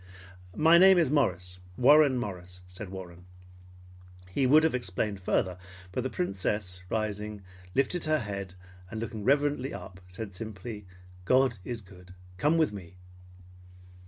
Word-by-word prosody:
"My 165 +2 +6
name 190 0 +8
is 160 -6 +3
Morris, 90 - 0 0.2
Warren 140 +1 +6
Morris," 90 -5 -6
said 90 +2 -8
Warren. 90 -2 -9 1.1
He 130 +7 +1
would 155 +4 +6
have 160 - +2
explained 105 -3 -2
farther, 90 -1 0 0.3
but 125 - -2
the 130 - -2
Princess, 100 - -2
rising, 105 -1 -3 0.3
lifted 160 +5 +1
her 155 0 +2
head 100 - -5 0.3
and 110 - -5
looking 110 -2 -5
reverently 140 0 +1
up, 90 +1 -10
said 100 +1 -8
simply, 105 0 -7 0.4
"God 130 0 +3
is 120 +2 -5
good! 90 -2 -15 0.2
Come 150 - +2
with 160 -9 +2
me!" 90 -3 -10
105 Hz, 135 wpm, -29 LUFS, 95-135 Hz, 1.1 s, name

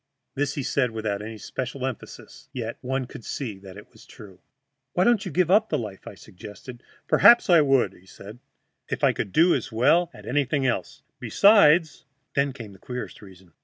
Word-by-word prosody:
This 145 +1 -2
he 140 - -3
said 125 -1 0
without 110 -3 -4
any 110 +1 -8
special 130 +4 -5
emphasis, 130 -3 -9
yet 115 -3 -5
one 130 +1 -3
could 120 - -12
see 110 -7 -6
that 95 -1 -13
it 105 - -14
was - - -18
true. 95 -3 -14 0.5
"Why 180 - +2
don't 235 -1 +2
you 185 - -6
give 180 +3 +1
up 215 +3 +4
the - - 0
life?" 105 -4 -8
I - - -9
suggested. 105 +6 -12 0.3
"Perhaps 235 -5 +6
I 170 -2 +7
would," 135 -3 +2
said 105 +4 -12 0.5
he, - - -1
"if - - -18
I - - +4
could 100 - -4
do 170 - +4
as - - -3
well 165 +10 +2
at - - -15
anything 140 +1 -1
else. 120 -8 -3 0.2
Besides 175 -6 +4
" 135 - -50
Then 140 0 +1
came 115 -6 -10
the 95 - -17
queerest 125 +4 -7
reason. 95 -4 -17
130 Hz, 200 wpm, -24 LUFS, 110-150 Hz, 0.5 s, I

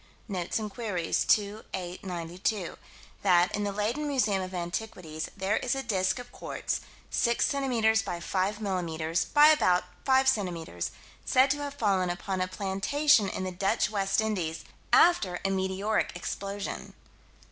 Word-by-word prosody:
Notes 185 -4 -2
and 215 -2 -4
Queries, 195 -8 -1
2 210 +1 +2
8 180 -1 -6
92: 180 +2 -3 0.5
That, 180 -2 +4
in 205 - -1
the 205 - -1
Leyden 220 +9 -1
Museum 220 -9 +1
of 185 0 -5
Antiquities, 175 -3 -4
there 195 +2 +1
is 255 +2 0
a 270 - -3
disk 190 -5 +1
of 245 0 -9
quartz: - - -3 0.3
6 235 -1 +2
centimeters 235 -6 +2
by 175 - -4
5 195 +4 -1
millimeters 170 -4 -1
by 295 +1 +6
about 185 -13 +4 0.2
5 265 0 +4
centimeters; 175 - -1 0.3
said 260 +1 +4
to 290 - +1
have 285 -1 -5
fallen 195 -8 +1
upon 185 +1 -3
a 185 - +1
plantation 200 +6 +2
in 185 - -4
the 185 - -3
Dutch 190 +2 0
West 195 0 +1
Indies, 180 -7 -2 0.3
after 205 - +4
a 195 - +2
meteoric 190 +3 0
explosion. 195 +3 -5
195 Hz, 150 wpm, -29 LUFS, 180-225 Hz, 0.5 s, by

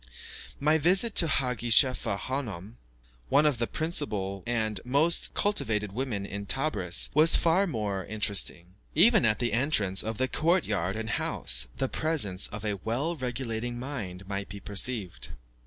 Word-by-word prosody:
My 155 +2 +2
visit 190 +8 +3
to 170 - +8
Haggi 125 -5 -1
Chefa 120 -4 +2
Hanoum, 115 -5 -5 0.5
one 150 - +4
of 145 -6 +1
the 115 - -1
principal 105 - -2
and 110 -4 -2
most 145 +7 +1
cultivated 110 - -1
women 110 -3 -3
in 100 0 -7
Tebris, 105 - 0
was 155 +3 +7
far 180 +4 +2
more 105 - -3
interesting. 100 -4 0 0.2
Even 215 - +5
at 105 -1 +2
the 120 -3 -2
entrance 110 - +2
of 110 0 -5
the 130 - 0
court 165 +5 +1
yard 95 -2 -2
and 110 0 -5
house, - - -1
the 135 - 0
presence 130 - 0
of 105 +1 -8
a 105 -1 -2
well 135 +10 -1
regulating 120 -3 -4
mind 105 -8 -6
might 100 0 -5
be 100 +1 -8
perceived. 100 -1 -3
115 Hz, 155 wpm, -27 LUFS, 100-145 Hz, 0.5 s, to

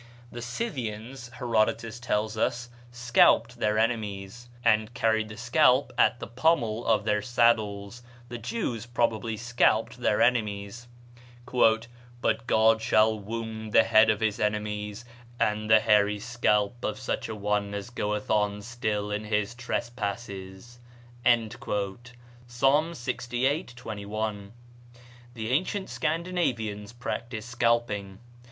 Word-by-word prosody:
The 120 - -7
Scythians, 120 - -5
Herodotus 115 -1 0
tells 110 -2 -1
us, 120 +2 -1 0.2
scalped 120 0 +3
their 105 0 +1
enemies, 110 0 -2 0.2
and 110 -1 +3
carried 110 -2 +1
the 105 - -9
scalp 125 +3 +3
at - - +3
the - - -5
pommel 120 -4 +1
of 110 -3 +3
their 105 -1 +1
saddles; 115 -3 +1 0.3
the 120 0 -7
Jews 120 - -3
probably 115 -2 0
scalped 115 0 +1
their 105 -4 +1
enemies: 110 -1 0 0.7
"But 120 0 0
God 110 0 +4
shall 110 0 +3
wound 110 0 -6
the - - +7
head 110 +1 +5
of 110 0 +1
his 110 -1 0
enemies, 105 +1 -2 0.3
and 105 0 0
the 110 0 +8
hairy 105 -1 +3
scalp 115 0 0
of 105 - -2
such 130 - -3
a 110 - -4
one 105 0 -1
as 100 +3 -6
goeth 105 -3 -2
on 105 -1 +1
still 105 -3 -2
in 105 +1 -3
his 105 +1 -1
trespasses." 115 -3 -5 0.4
(Psa., - - +4 1.3
lxviii., 135 -2 0
21.) 105 -2 -5 0.8
The 110 0 -4
ancient 185 +7 -1
Scandinavians 130 - -2
practised 120 -2 -5
scalping. 115 -5 0
110 Hz, 120 wpm, -27 LUFS, 105-120 Hz, 1.3 s, the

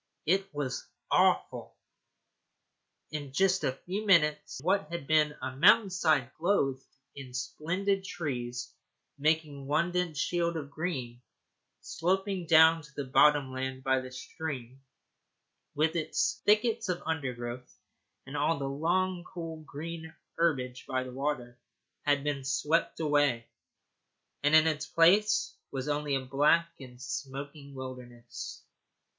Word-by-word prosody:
It 195 +3 +1
was 145 -4 -4 0.2
awful. - - +2 1.4
Just 155 +7 +1
a - - +2
few 195 +4 -3
minutes, 150 -8 +3
and 140 - -13
what 190 -3 +1
had 170 -5 -4
been 150 0 +3
a 130 - -4
mountain 195 - +6
side 155 -8 +2
clothed 140 -7 +1 0.3
in 130 -3 -9
splendid 185 +10 -1
trees, 125 -9 -4 0.5
making 150 -2 0
one 165 +4 +1
dense 180 -4 -1
shield 170 +2 0
of 145 -2 -6
green, 135 -7 -4 0.6
sloping 190 +1 -1
down 160 +1 +7
to 150 -1 -15
the 145 - -3
bottom 140 +1 +4
land 130 0 -4
by 130 0 +2
the 130 0 -9
stream, 130 -2 -6 0.9
with 160 +3 +1
its 190 +6 0
thickets 220 0 +3
of 180 -1 -2
undergrowth, 125 -6 -4 0.5
and 135 - -8
all 155 +3 +1
the 140 -1 -3
long 175 +5 0
cool 165 -3 -7
green 160 +2 -7 0.2
herbage 130 -7 0
by 130 0 -1
the 130 - -8
water, 130 -3 -3 0.5
had 145 -1 +2
been 145 -2 -2
swept 150 +4 0
away, 145 -6 +2 1.0
and 145 +2 +4
in 155 0 +7
its 155 -2 0
place 210 +6 +4
was 135 0 -4
only 145 -1 0
a 135 -1 -2
black 150 +5 +3
and 125 -2 -12
smoking 140 +2 -6
wilderness. 125 -2 -8
150 Hz, 130 wpm, -30 LUFS, 130-170 Hz, 1.4 s, down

